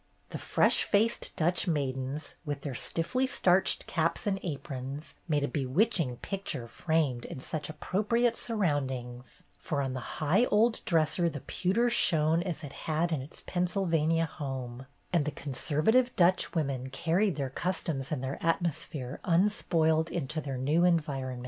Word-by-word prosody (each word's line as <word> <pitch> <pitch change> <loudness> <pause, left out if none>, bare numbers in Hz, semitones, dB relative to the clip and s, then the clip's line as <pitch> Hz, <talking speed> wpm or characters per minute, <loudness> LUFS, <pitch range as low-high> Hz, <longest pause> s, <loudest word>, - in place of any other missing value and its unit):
The - - -5
fresh - - +3
faced 220 +3 +1
Dutch 175 +4 +2
maidens, 140 -1 -2
with 145 -3 -4
their 140 -2 -4
stiffly 255 - -1
starched 185 -6 +3
caps 165 -1 -1
and 195 -2 0
aprons, 140 -3 -5
made 150 -3 +1
a - - +1
be 145 -2 -2
witching 150 - +1
picture 150 -5 -4
framed 145 -4 0
in - - -7
such 150 +3 -4
appropriate 215 +9 +1
surroundings, 130 - -3 0.2
for 145 - -2
on 135 -2 -1
the 130 - -3 0.2
high 175 +10 +3
old 225 +1 +2
dresser 170 -1 +2
the 145 -4 -7
pewter 205 +7 +1
shone 160 -5 +3
as 175 -3 -4
it 145 - -7
had 165 +2 -1
in 155 -5 0
its 140 +5 -11
Pennsylvania 170 -3 +1
home, 130 -4 -6 0.3
and 170 -4 +3
the 150 - -1
conservative 155 - +1
Dutch 180 +1 +3
women 135 -5 -1
carried 170 +7 +1
their 135 -3 -3
customs 160 -4 -2
and 140 -4 -2
their 135 +1 -4
atmosphere 160 -5 -1
unspoiled 165 -3 +2
into 155 -1 -2
their 135 -3 -4
new 150 +7 +2
environment. 140 -7 0
160 Hz, 150 wpm, -30 LUFS, 135-180 Hz, 0.3 s, fresh